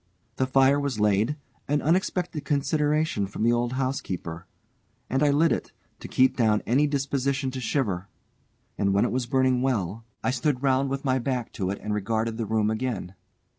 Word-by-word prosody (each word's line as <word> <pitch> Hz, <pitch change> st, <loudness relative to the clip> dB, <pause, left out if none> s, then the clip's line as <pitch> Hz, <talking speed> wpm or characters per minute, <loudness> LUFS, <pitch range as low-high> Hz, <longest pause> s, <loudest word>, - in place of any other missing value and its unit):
The 130 Hz, -, +1 dB
fire 135 Hz, +2 st, +4 dB
was 140 Hz, -6 st, -2 dB
laid, 105 Hz, +6 st, +2 dB, 0.3 s
an 145 Hz, +1 st, +2 dB
unexpected 175 Hz, -1 st, 0 dB
consideration 150 Hz, -, +1 dB
from 100 Hz, -, -4 dB
the 120 Hz, +1 st, +4 dB
old 120 Hz, +1 st, 0 dB
housekeeper, 95 Hz, -10 st, -3 dB, 0.6 s
and 135 Hz, +2 st, +1 dB
I 150 Hz, -, +4 dB
lit 155 Hz, +4 st, +3 dB
it, -, -, -2 dB, 0.3 s
to -, -, -8 dB
keep 130 Hz, +1 st, +3 dB
down 110 Hz, -3 st, +2 dB
any 140 Hz, +6 st, +3 dB
disposition 140 Hz, -1 st, -1 dB
to 130 Hz, 0 st, -5 dB
shiver, 110 Hz, -7 st, -1 dB, 0.7 s
and 100 Hz, -1 st, +2 dB
when 100 Hz, -, +4 dB
it -, -, -1 dB
was 125 Hz, -1 st, -1 dB
burning 130 Hz, -1 st, +2 dB
well, 115 Hz, -5 st, -1 dB, 0.2 s
I -, -, +1 dB
stood 130 Hz, +1 st, -1 dB
round 135 Hz, 0 st, +2 dB
with 135 Hz, +1 st, -3 dB
my 130 Hz, -1 st, +2 dB
back 125 Hz, -1 st, -2 dB
to 95 Hz, -2 st, -2 dB
it 100 Hz, -, -2 dB
and 105 Hz, -, -2 dB
regarded 110 Hz, +2 st, -1 dB
the 115 Hz, -2 st, -3 dB
room 110 Hz, 0 st, +1 dB
again. 110 Hz, -5 st, -3 dB
130 Hz, 180 wpm, -26 LUFS, 110-140 Hz, 0.7 s, fire